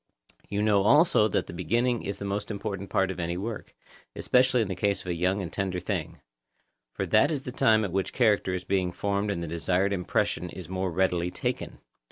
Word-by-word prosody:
You 105 +1 -1
know 105 -2 +4
also 140 - +5
that 105 - 0
the - - -9
beginning 115 +8 0
is 100 - -4
the 100 - -6
most 100 +1 -3
important 100 -2 -4
part 95 0 +1
of 95 - -7
any 85 0 -2
work, 110 +3 -6 0.4
especially 125 -1 +3
in - - -5
the 95 - -3
case 100 +2 0
of - - -15
a 90 - -1
young 90 +4 0
and 85 - -7
tender 95 -2 -2
thing; - - -4 0.7
for - - -3
that 140 - +4
is 145 -4 -2
the 125 - -5
time 110 -5 +3
at 95 - -4
which 95 +1 -1
the - - -16
character 105 -6 +3
is 90 - -4
being 95 -2 0
formed 100 +3 -1
and 85 -4 -2
the - - -4
desired 90 +4 0
impression 90 -1 -1
is 90 -1 -9
more 95 +1 -2
readily 90 0 +1
taken. - - -4
100 Hz, 220 wpm, -27 LUFS, 90-105 Hz, 0.7 s, also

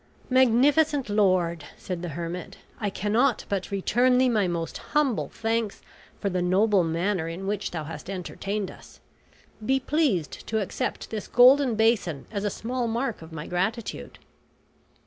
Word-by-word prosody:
"Magnificent 265 +2 +4
lord," 185 -6 +2
said 180 -2 -5
the 175 - -4
hermit, 170 +1 -5 0.2
"I 210 - -1
cannot 220 +6 +1
but 195 -2 -2
return 245 +6 +2
thee 255 0 +4
my 210 -5 +2
most 170 -2 -3 0.2
humble 275 -7 +1
thanks 225 -2 -2 0.4
for - - -2
the 180 -2 0
noble 190 +2 +3
manner 170 +1 -1
in 170 +4 -5
which 205 0 -2
thou 160 -3 -4
hast 155 +3 -8
entertained 195 +1 -4
us. - - -16 0.6
Be 265 +4 +2
pleased 265 - 0
to 220 - 0
accept 200 - -3
this 215 -3 -4
golden 255 0 +6
basin 215 -9 +1
as 205 -2 -3
a 205 - +1
small 240 +4 -3
mark 230 -1 -2
of 160 +1 -11
my 160 -1 -6
gratitude." 205 +6 -3
205 Hz, 150 wpm, -26 LUFS, 180-240 Hz, 0.6 s, golden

